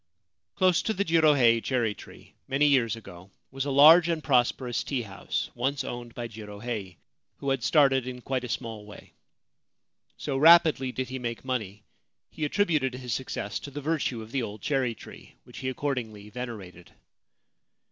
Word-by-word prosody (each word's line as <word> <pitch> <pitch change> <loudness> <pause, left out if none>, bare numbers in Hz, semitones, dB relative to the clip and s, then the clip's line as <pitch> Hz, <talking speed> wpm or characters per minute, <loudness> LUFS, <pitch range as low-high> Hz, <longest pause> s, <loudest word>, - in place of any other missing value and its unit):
Close 185 -2 +3
to 220 - -2
the 200 +2 0
Jirohei 145 -8 +4
cherry 120 -5 0
tree, - - -15
many 140 +2 +2
years 125 -6 +3
ago, 95 -4 -12 0.2
was 135 +1 -3
a - - -2
large 160 +5 +7
and 165 -2 -1
prosperous 125 -2 +1
tea 130 -4 -2
house, 100 -3 -4
once 135 +3 -1
owned 120 -2 -7
by 120 -1 -4
Jirohei, 105 -3 -7 0.4
who 140 - -2
had 135 -3 -1
started 135 -4 +3
in 125 -1 -6
quite 130 0 -2
a 125 - -6
small 110 -2 -4
way. 105 - -13 1.0
So 140 -3 -3
rapidly 155 -4 +6
did 130 0 -4
he 130 0 -5
make 120 0 -5
money, 105 -6 -4 0.5
he 155 - -3
attributed 150 -7 +1
his 125 -2 -5
success 120 -5 -4
to - - -8
the 145 +1 -7
virtue 145 -6 -2
of 110 - -13
the 135 - -1
old 105 -2 -7
cherry 135 -5 0
tree, - - -14
which - - -12
he 130 - -2
accordingly 115 -7 -4
venerated. 105 -8 -8
130 Hz, 165 wpm, -27 LUFS, 115-140 Hz, 1.0 s, large